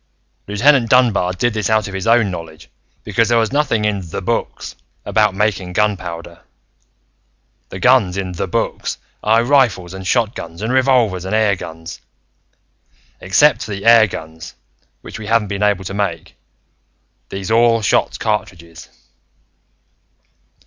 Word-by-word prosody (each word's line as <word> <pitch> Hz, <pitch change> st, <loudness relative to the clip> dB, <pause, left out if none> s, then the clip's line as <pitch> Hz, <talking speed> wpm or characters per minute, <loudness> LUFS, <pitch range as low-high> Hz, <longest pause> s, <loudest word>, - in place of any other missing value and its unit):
"Lieutenant 115 Hz, +4 st, +3 dB
Dunbar 115 Hz, -8 st, +3 dB
did 120 Hz, +5 st, -1 dB
this 105 Hz, -3 st, -2 dB
out 110 Hz, -2 st, +1 dB
of 100 Hz, -, -8 dB
his 95 Hz, +3 st, -4 dB
own 115 Hz, -3 st, +3 dB
knowledge 80 Hz, -2 st, -9 dB, 0.3 s
because 110 Hz, +2 st, 0 dB
there 120 Hz, -1 st, +3 dB
is 110 Hz, +1 st, 0 dB
nothing 135 Hz, -7 st, 0 dB
in 105 Hz, -2 st, -1 dB
The 95 Hz, +3 st, -6 dB
Books 115 Hz, +5 st, -3 dB, 0.3 s
about -, -, +1 dB
making 95 Hz, -3 st, -1 dB
gunpowder. 85 Hz, -5 st, -3 dB, 1.3 s
The 95 Hz, -, -8 dB
guns 105 Hz, -5 st, +3 dB
in 95 Hz, -2 st, -3 dB
The 90 Hz, +2 st, -4 dB
Books -, -, -3 dB, 0.2 s
are 110 Hz, +2 st, +3 dB
rifles 120 Hz, -10 st, +1 dB
and 95 Hz, -1 st, -7 dB
shotguns 105 Hz, -6 st, -2 dB
and 115 Hz, +3 st, -1 dB
revolvers 125 Hz, -8 st, +2 dB
and 95 Hz, +3 st, -2 dB
airguns. 90 Hz, -7 st, -2 dB, 1.2 s
Except 145 Hz, +10 st, +3 dB
for -, -, -9 dB
the 100 Hz, -1 st, -5 dB
airguns, 85 Hz, -8 st, +2 dB, 0.5 s
which -, -, -9 dB
we 105 Hz, -, -8 dB
haven't 115 Hz, -2 st, +1 dB
been 100 Hz, 0 st, -4 dB
able 100 Hz, -2 st, +1 dB
to 95 Hz, -, -5 dB
make, 100 Hz, -5 st, -4 dB, 0.9 s
these 95 Hz, +2 st, -5 dB
all 115 Hz, 0 st, +3 dB
shot -, -, +1 dB
cartridges. 90 Hz, -6 st, -4 dB
105 Hz, 135 wpm, -17 LUFS, 90-115 Hz, 1.3 s, Lieutenant